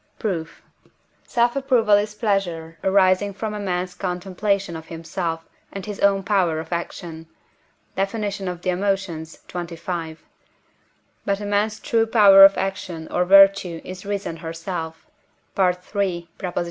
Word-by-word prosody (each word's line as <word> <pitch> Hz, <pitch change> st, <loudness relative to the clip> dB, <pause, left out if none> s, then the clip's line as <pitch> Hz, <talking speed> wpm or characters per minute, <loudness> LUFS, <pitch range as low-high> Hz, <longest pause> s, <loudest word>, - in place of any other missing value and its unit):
Proof. 165 Hz, -6 st, -4 dB, 0.6 s
Self 240 Hz, +1 st, +1 dB
approval 255 Hz, -6 st, +2 dB
is 205 Hz, +1 st, +2 dB
pleasure 175 Hz, -7 st, -2 dB
arising 190 Hz, +1 st, +3 dB
from 210 Hz, +2 st, -4 dB
a 210 Hz, -, -4 dB
man's 180 Hz, -2 st, -2 dB
contemplation 190 Hz, +1 st, -2 dB
of 160 Hz, 0 st, -9 dB
himself 165 Hz, 0 st, -4 dB, 0.3 s
and 195 Hz, -2 st, -7 dB
his 205 Hz, -1 st, -6 dB
own 195 Hz, -1 st, +3 dB
power 185 Hz, -6 st, +1 dB
of 160 Hz, -, -6 dB
action 170 Hz, -1 st, -6 dB, 0.7 s
(Def. 195 Hz, +3 st, -1 dB
of 195 Hz, -5 st, -3 dB
the 185 Hz, -, -1 dB
Emotions, 180 Hz, -4 st, -2 dB
xxv.). 170 Hz, -2 st, -5 dB, 1.1 s
But 200 Hz, 0 st, -1 dB
a 205 Hz, -, -5 dB
man's 210 Hz, +2 st, 0 dB
true 225 Hz, 0 st, +1 dB
power 200 Hz, -4 st, +8 dB
of 195 Hz, 0 st, +8 dB
action 185 Hz, -4 st, -4 dB
or 180 Hz, -, +1 dB
virtue 195 Hz, -3 st, +5 dB
is 185 Hz, 0 st, -8 dB
reason 200 Hz, -4 st, -4 dB
herself 165 Hz, 0 st, -6 dB, 0.5 s
(III. 180 Hz, -2 st, +2 dB, 0.2 s
iii.) 175 Hz, -4 st, -1 dB
190 Hz, 135 wpm, -22 LUFS, 170-200 Hz, 1.1 s, power